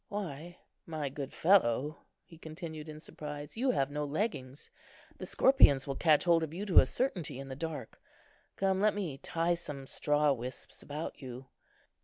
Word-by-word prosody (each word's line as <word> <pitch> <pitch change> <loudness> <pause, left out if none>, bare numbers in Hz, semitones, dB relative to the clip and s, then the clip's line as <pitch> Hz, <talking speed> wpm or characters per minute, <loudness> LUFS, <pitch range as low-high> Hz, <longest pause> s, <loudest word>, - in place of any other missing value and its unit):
Why, 175 -4 -5 0.3
my 155 -4 -3
good 135 0 -6
fellow," 150 - +3 0.3
he 165 - -15
continued, 160 -1 -7
in 155 0 -8
surprise, 150 -2 -7
"you 255 +4 +1
have 140 - +1
no 150 +1 -2
leggings. 145 - -3 0.5
The - - -5
scorpions 200 - +5
will 135 -2 -3
catch 155 0 +4
hold 170 -2 +4
of 160 0 -4
you 200 +3 -3
to 190 - +7
a - - +4
certainty 180 - -2
in 135 0 -7
the 130 - -5
dark. 160 +1 -6 0.5
Come, 190 0 +1
let 210 0 +3
me 170 -10 -3
tie 165 +4 0
some 145 -5 -6
straw 150 +1 +2
wisps 125 0 -7
about 150 +2 -6
you." 130 0 -8
155 Hz, 170 wpm, -32 LUFS, 140-175 Hz, 0.5 s, to